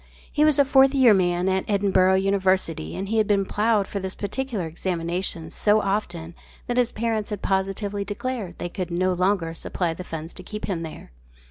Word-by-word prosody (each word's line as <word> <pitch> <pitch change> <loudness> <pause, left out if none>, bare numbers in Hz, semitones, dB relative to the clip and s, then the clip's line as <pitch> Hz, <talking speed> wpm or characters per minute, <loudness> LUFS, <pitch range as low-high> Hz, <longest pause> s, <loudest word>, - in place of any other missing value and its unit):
He 300 - +2
was 305 -2 +4
a 280 - +5
"Fourth 270 0 +5
Year 255 -5 +7
Man" 180 -1 +1
at 190 0 +1
Edinburgh 190 -2 +3
University 190 - +1
and 195 - -4
he 220 +2 +1
had 215 - +2
been 200 -1 +2
ploughed 210 0 +1
for 200 - -4
this 190 -1 -5
particular 220 -2 -3
examination 170 0 -3
so 210 0 +3
often 175 -5 -2 0.3
that 245 - -2
his 245 -1 +3
parents 220 -1 -1
had 210 -2 -5
positively 195 +1 -1
declared 205 -2 -4
they - - -3
could 180 0 -5
no 185 +2 +1
longer 180 -2 +1
supply 165 0 -2
the 180 - -7
funds 165 -1 -6
to - - -10
keep 210 +3 -6
him 180 -5 -2
there. 160 - -8
195 Hz, 195 wpm, -24 LUFS, 180-215 Hz, 0.3 s, Year